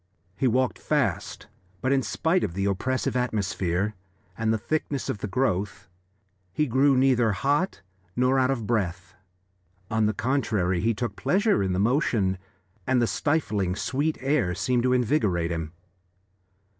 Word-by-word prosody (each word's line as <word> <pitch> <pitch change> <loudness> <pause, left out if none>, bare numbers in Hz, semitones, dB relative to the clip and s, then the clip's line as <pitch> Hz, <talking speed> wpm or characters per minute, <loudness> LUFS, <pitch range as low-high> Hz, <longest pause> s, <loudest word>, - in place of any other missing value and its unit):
He 130 - +1
walked 125 -1 +1
fast, - - -1 0.3
but 130 - 0
in 135 -1 +3
spite 170 +7 0
of 85 - -3
the 100 0 -1
oppressive 130 +8 -1
atmosphere 100 -4 -1 0.4
and 110 -1 0
the 110 - +2
thickness 140 +3 -2
of 125 -6 -2
the 105 - -3
growth 100 -3 -1 0.6
he 150 +11 +1
grew 135 +1 +3
neither 125 -4 +3
hot 145 - 0 0.3
nor 130 +2 +3
out 130 0 +2
of 125 -5 -1
breath; 95 -4 -2 0.8
on 110 -1 +2
the 110 - 0
contrary, 110 -8 0
he 115 +1 +1
took 115 -2 -3
pleasure 205 - +2
in 95 -1 0
the - - -1
motion, 105 - +1 0.5
and 130 -1 +3
the 120 - +3
stifling, 105 - 0
sweet 145 +9 -1
air 130 -10 +1
seemed 125 -1 +1
to 125 +1 +2
invigorate 105 - +1
him. 80 -2 -3
115 Hz, 150 wpm, -26 LUFS, 100-135 Hz, 0.8 s, in